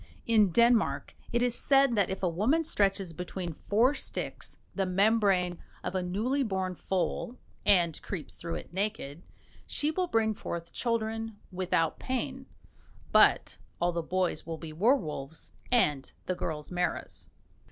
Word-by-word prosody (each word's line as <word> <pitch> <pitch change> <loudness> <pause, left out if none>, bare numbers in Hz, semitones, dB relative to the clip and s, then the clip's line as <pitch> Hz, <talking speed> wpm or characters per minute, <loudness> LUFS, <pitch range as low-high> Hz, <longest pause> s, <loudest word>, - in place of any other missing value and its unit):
In 215 -4 +5
Denmark 225 - +3 0.2
it 240 +1 +2
is 245 -1 +2
said 275 0 +4
that 200 -3 +2
if 190 0 -4
a - - +4
woman 220 - +2
stretches 195 - +1
between 180 0 -5
four 230 - +2
sticks 270 - -5 0.2
the 195 -2 0
membrane 195 -2 +2 0.2
of - - -3
a 185 - 0
newly 215 +10 0
born 190 -6 -1
foal, 190 +7 -2 0.3
and 175 -6 +4
creeps 180 -6 -6
through 170 0 -5
it - - -8
naked, 190 -6 -3 0.5
she 295 +1 +1
will 365 +3 0
bring 225 -7 +2
forth 170 -4 -6
children 225 -2 -2
without 175 -3 0
pain, 260 +1 -3 0.6
but - - +4 0.2
all 175 0 +2
the 170 0 -2
boys 180 +2 +1
will 165 -1 -5
be 160 -1 -8
werwolves 160 - 0 0.2
and 150 - +2
the 185 - 0
girls 155 -3 -4
maras. 180 0 -3
195 Hz, 145 wpm, -30 LUFS, 175-230 Hz, 0.6 s, In